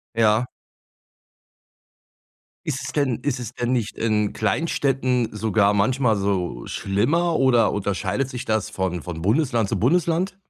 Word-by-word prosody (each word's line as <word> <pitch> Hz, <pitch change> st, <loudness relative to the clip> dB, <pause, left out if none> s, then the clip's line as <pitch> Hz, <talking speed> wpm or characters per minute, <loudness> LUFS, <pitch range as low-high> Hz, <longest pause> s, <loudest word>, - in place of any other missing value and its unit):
Ja. 110 Hz, +1 st, +3 dB, 2.2 s
Ist 140 Hz, -2 st, -2 dB
es -, -, -5 dB
denn 140 Hz, -6 st, 0 dB
ist 135 Hz, -3 st, -1 dB
es 120 Hz, 0 st, -6 dB
denn 120 Hz, +1 st, -1 dB
nicht 115 Hz, -4 st, -1 dB
in 105 Hz, -2 st, 0 dB
Kleinstädten 130 Hz, 0 st, 0 dB
sogar 105 Hz, -1 st, +2 dB
manchmal 115 Hz, +2 st, +2 dB
so 95 Hz, -10 st, -2 dB
schlimmer 150 Hz, -, 0 dB
oder 120 Hz, -4 st, +3 dB
unterscheidet 100 Hz, +5 st, -1 dB
sich 125 Hz, -2 st, -6 dB
das 110 Hz, -2 st, -1 dB
von 90 Hz, -3 st, -2 dB
von 80 Hz, -2 st, -6 dB
Bundesland 115 Hz, -, +1 dB
zu 105 Hz, -, 0 dB
Bundesland? 170 Hz, -, +1 dB
115 Hz, 130 wpm, -23 LUFS, 100-130 Hz, 2.2 s, Ja